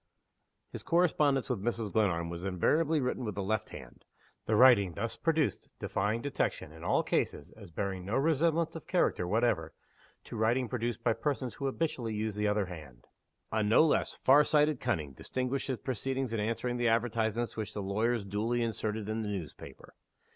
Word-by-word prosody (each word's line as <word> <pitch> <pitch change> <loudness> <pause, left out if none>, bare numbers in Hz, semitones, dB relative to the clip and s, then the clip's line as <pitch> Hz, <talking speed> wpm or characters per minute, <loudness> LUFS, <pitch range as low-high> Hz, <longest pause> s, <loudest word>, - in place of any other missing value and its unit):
His - - -6
correspondence 150 -6 +2
with 125 -7 -2
Mrs. 115 -1 -2
Glenarm 85 -6 +1
was 85 +1 -6
invariably 150 - +2
written 125 -1 -2
with 105 -4 -4
the 100 - -2
left 110 +2 -1
hand 60 -2 -11 0.4
the 110 - +2
writing 105 -6 +6
thus 115 +2 -3
produced 160 -2 0
defying 105 +4 -1
detection, 140 - -2
in 80 +1 -12
all 90 - +2
cases, 75 - -1
as 100 -4 -13
bearing 95 +2 -3
no 100 +5 -2
resemblance 160 +3 +2
of 165 - -8
character 175 - +1
whatever 100 -7 0 0.5
to - - -9
writing 120 +4 +1
produced 120 -1 -3
by 115 - +3
persons 130 +1 -2
who 140 - -3
habitually 130 -6 -2
use 110 0 -2
the 105 +1 0
other 105 -1 +1
hand. 75 -9 -11 0.5
A 110 - +1
no 105 +9 +5
less 155 - +1
far 140 +3 +5
sighted 150 -2 +3
cunning 75 -3 -1
distinguished 130 - -3
his 130 -3 -1
proceedings 130 +2 -3
in 115 - -1
answering 115 +3 -1
the 120 0 +1
advertisements 115 0 0
which 110 -1 -5
the 105 - -3
lawyers 110 +3 0
duly 110 +5 -1
inserted 110 -2 -3
in 110 +1 -2
the 105 - -3
newspaper. 90 -8 -8
115 Hz, 175 wpm, -31 LUFS, 100-130 Hz, 0.5 s, writing